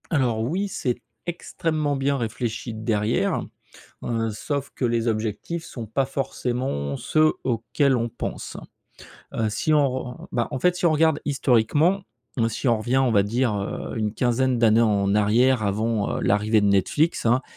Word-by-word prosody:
Alors 125 -7 +1
oui, 175 - -1
c'est 125 -10 -2 0.3
extrêmement 155 -3 -2
bien 140 +1 0
réfléchi 115 0 -3
derrière, 110 0 0 0.6
heu, 115 -1 -1
sauf 140 +6 -3
que - - -3
les 115 -1 +1
objectifs 110 +10 -2
sont 120 -8 -7
pas 125 +6 0
forcément 125 - -2
ceux 155 - +2
auxquels 130 +3 +1
on 120 0 -1
pense. - - -6 0.8
Heu, 110 -1 0
si 155 +9 0
on 145 -2 +4
re 130 +1 -3
on - - -11
on - - -10
bah, 120 - 0
en 130 - -3
fait, 180 +3 +3
si 180 - -1
on 170 - +5
regarde 155 -1 +3
historiquement. 145 - +2 0.4
Mmh, 115 -2 +2
si 115 +4 -3
on 115 - +3
revient, 120 +4 -1
on 130 -2 +3
va 100 -3 +4
dire, 115 +3 0
heu, 100 +3 -4
une 105 -1 -1
quinzaine 125 +1 +1
d'années 115 -1 +4
en 100 -3 +2
arrière, 110 +4 +3
avant, 105 +1 0
heu, - - -3
l'arrivée 105 +2 +2
de - - +2
Netflix, 110 - +1
hein. 120 +3 +3
120 Hz, 175 wpm, -24 LUFS, 110-140 Hz, 0.8 s, on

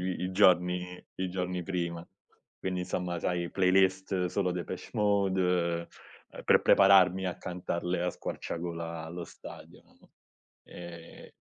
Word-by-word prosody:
i 90 0 -3
i 90 - -3
giorni 90 -1 +3
i 95 0 -2
giorni 90 0 -2
prima. 85 -2 -3 0.5
Quindi 90 -1 -2
insomma 90 -1 -3
sai 85 -1 -1
playlist 95 0 +2
solo 90 0 0
Depeche 90 +1 -6
Mode, 95 -5 +1 0.4
ehm, - - -10
per - - +5
prepararmi 95 -1 +6
a 90 - -3
cantarle 90 0 -3
a 90 - 0
squarciagola 85 -1 -5
allo 85 +2 -6
stadio, - - -12
no, - - -25 0.5
ehm 85 -1 -11
90 Hz, 125 wpm, -30 LUFS, 85-95 Hz, 0.5 s, prepararmi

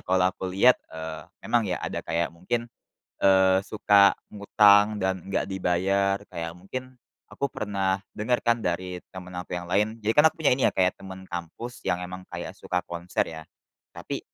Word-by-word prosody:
kalau 95 0 +2
aku 95 - -5
lihat, 100 +7 +4
eee, 80 0 -7 0.2
emang 115 -4 +1
ya 90 - 0
ada - - -3
kayak 85 0 -2
mungkin, 115 +8 -2 0.6
eee, 95 -1 +5
suka 100 -1 +5 0.2
ngutang 105 0 +5
dan 95 -2 -1
nggak 95 0 -1
dibayar. 95 +1 +1
Kayak 85 -2 -5
mungkin 130 +6 -8 0.3
aku 140 - -2
pernah 100 -2 -1
denger 120 +3 0
kan 120 0 +2
dari 90 -1 -3
temen 90 -1 -9
aku 90 0 -5
yang 90 - -6
lain, 105 +5 0
jadi 110 +2 +2
kan 150 +2 +6
aku 160 - -25
punya 140 - +5
ini 130 - +3
ya - - -12
kayak 90 -1 +3
temen 95 -1 -9
kampus 90 +8 -7
yang 90 - 0
emang 90 +1 -7
kayak - - -6
suka 90 0 -3
konser 85 +1 -2
ya. 80 -1 -8 0.5
Tapi - - -5
95 Hz, 175 wpm, -26 LUFS, 90-105 Hz, 0.6 s, kan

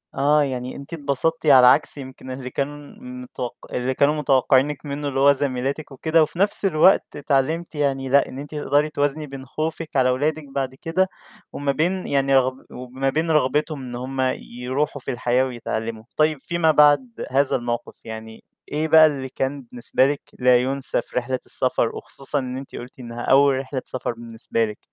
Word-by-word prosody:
آه 145 +2 +3
يعني 125 -2 -4
أنتِ 140 +4 -10
اتبسطتِ 155 +2 -1
على 130 -4 +8
عكس 145 +3 +4
يمكن 130 -1 -9
اللي 130 0 -6
كانوا 140 +3 -3 0.2
متوقع 255 - -7
اللي 125 +1 -1
كانوا 145 +3 +3
متوقعينِك 140 0 +2
منه، 145 0 -4
اللي 135 -1 -2
هو 140 +1 +7
زميلاتِك 140 +1 -2
وكده. 160 +5 +2
وفي 160 +3 -5
نفس 200 +1 +1
الوقت 185 +1 +4
اتعلمتِ 150 +4 -1
يعني 135 -2 -1
لأ، 140 +2 +4
إن 130 - -8
أنتِ 145 +2 -8
تقدري 145 0 +1
توازني 145 +1 -1
بين 135 -1 -9
خوفِك 155 +3 -4
على 130 -2 +4
ولادِك 150 +5 0
بعد 135 -1 -2
كده 180 +6 0 0.4
وما 140 -1 -1
بين 175 +6 -1
يعني 135 -1 +2
رغب 130 0 +1
وما 130 +2 -3
بين 160 +4 0
رغبتهم 150 0 +1
إن 120 -1 -7
هم 130 +2 -5 0.2
يروحوا 130 +4 -3
في - - -4
الحياة 125 +1 +1
ويتعلموا. 115 -3 -4
طيب 155 -1 +2
فيما 165 +2 +1
بعد 145 -5 +3
هذا 140 +1 +2
الموقف 120 -1 -4
يعني، 110 0 -9 0.3
إيه 155 +2 0
بقى 160 0 +8
اللي 135 -4 -1
كان 135 +2 -3
بالنسبة 125 +1 0
لِك 145 0 -2 0.2
لا 125 -1 +5
يُنسي 130 0 0
في - - -9
رحلة 125 +1 -1
السفر؟ 125 -2 +1
وخصوصًا 140 +2 -3
إن 130 -1 -4
أنتِ 135 0 -9
قُلتِ 125 +2 -9
إنها 120 -1 -7
أول 135 +1 +4
رحلة 130 -1 -4
سفر 130 - -3
بالنسبة 115 0 -2
لِك. 105 -1 -7
135 Hz, 180 wpm, -22 LUFS, 130-150 Hz, 0.4 s, على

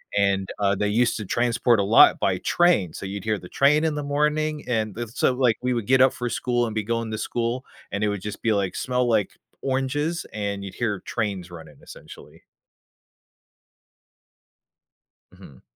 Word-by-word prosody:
and, 100 -1 +1
uh, 100 0 +2
they 105 +2 -1
used 115 +3 +1
to 105 - -5
transport 120 +2 +2
a 100 - +2
lot 110 +4 +6
by 95 -2 +1
train, 170 - +2
so 95 - -6
you'd 100 0 -6
hear 110 -2 -1
the 90 - -12
train 150 +3 +3
in 155 -2 0
the 150 - -3
morning 150 +1 0
and 110 -4 -1
it's 120 -1 -6
so 130 - +3
like, 125 -3 +2
we 125 0 +1
would 115 -3 -3
get 130 0 +4
up 130 0 +5
for 125 0 -3
school 120 +1 0
and 110 - -6
be 110 - -1
going 115 +1 -2
to 110 - -3
school 120 +3 -2 0.3
and 100 +1 -2
it 105 - +2
would 105 -2 -3
just 105 0 -6
be, 115 - +2
like, 100 -3 -1
smell 125 -1 0
like 105 -3 +1 0.3
oranges, 140 +5 -1
and 100 -2 -4
you'd 100 - -7
hear 105 -5 -2
trains 95 -5 -3
running 80 -3 -11
essentially. - - -13 2.9
Mhm. 65 -3 -16
115 Hz, 185 wpm, -24 LUFS, 100-130 Hz, 2.9 s, lot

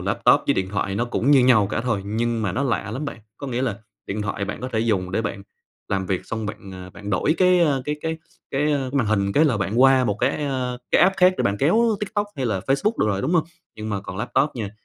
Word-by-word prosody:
laptop - - +3
với - - +3
điện 95 0 -1
thoại 95 -1 -2
nó 115 +4 0
cũng 120 +2 0
như 135 -4 +6
nhau 115 -5 +5
cả - - -1
thôi 115 -4 -1
nhưng 115 +2 -1
mà 100 -4 -1
nó 130 - -1
lạ 125 -5 -1
lắm 130 +7 -4
bạn, 140 - -6 0.2
có 140 - -7
nghĩa 125 -1 -2
là 115 -7 -2 0.3
điện 105 +2 -3
thoại 100 -1 -3
bạn 105 +2 -6
có 130 - -4
thể 110 - +1
dùng 100 -6 0
để 105 +5 -1
bạn 100 -2 -4 0.5
làm 95 -1 -1
việc 95 -1 -2
xong 110 -2 -4
bạn, 105 -2 -8
à, 90 0 -9
bạn 100 +3 -8
đổi 100 - +1
cái, 180 -1 +4
a, 145 -5 +2
cái 150 +2 -2
cái 160 0 -3 0.3
cái 145 +2 +1 0.2
màn 135 -5 +1
hình 100 -2 +1
cái 150 - +4
là 135 -7 +2
bạn 105 +4 -1
qua 135 -1 +6
một 105 -4 0
cái, - - +3
a, 130 -3 -2
cái - - +4
app 190 +2 +4
khác 185 0 +5
để - - 0
bạn 100 - +1
kéo 220 - +3
TikTok 205 0 -2
hay 130 -2 -1
là 100 -5 -1
Facebook 140 - +1
được - - +3
rồi, 100 -2 -1
đúng 150 +7 0
hông? 160 - +3 0.3
Nhưng 110 0 -5
mà 100 -2 -2
còn 95 -1 -8
laptop 135 +8 0
nha, 105 -4 -4
115 Hz, 270 wpm, -23 LUFS, 100-140 Hz, 0.5 s, như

